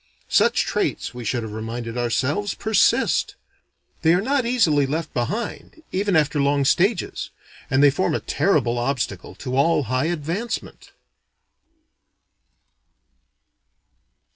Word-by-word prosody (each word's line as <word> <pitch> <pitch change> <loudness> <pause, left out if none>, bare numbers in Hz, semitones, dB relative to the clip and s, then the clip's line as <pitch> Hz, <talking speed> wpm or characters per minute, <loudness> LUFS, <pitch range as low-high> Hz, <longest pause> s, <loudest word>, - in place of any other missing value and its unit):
Such - - +3
traits, - - -2
we 125 0 -7
should 115 +2 -1
have 110 - -6
reminded 115 +1 -5
ourselves, 130 - -1
persist. 220 -1 +2 0.7
They 165 +1 +4
are - - +2
not 260 +1 0
easily 160 - +3
left 155 +3 -3
behind, 220 - -4
even 195 0 0
after 150 -1 +2
long 140 0 +2
stages; 190 - +1 0.4
and 135 +2 +3
they 145 - +7
form 170 +1 0
a - - 0
terrible 140 - +1
obstacle 125 0 -3
to 130 -2 -5
all 150 +2 +3
high 130 +3 -1
advancement. 175 +8 -4
145 Hz, 115 wpm, -22 LUFS, 125-190 Hz, 0.7 s, they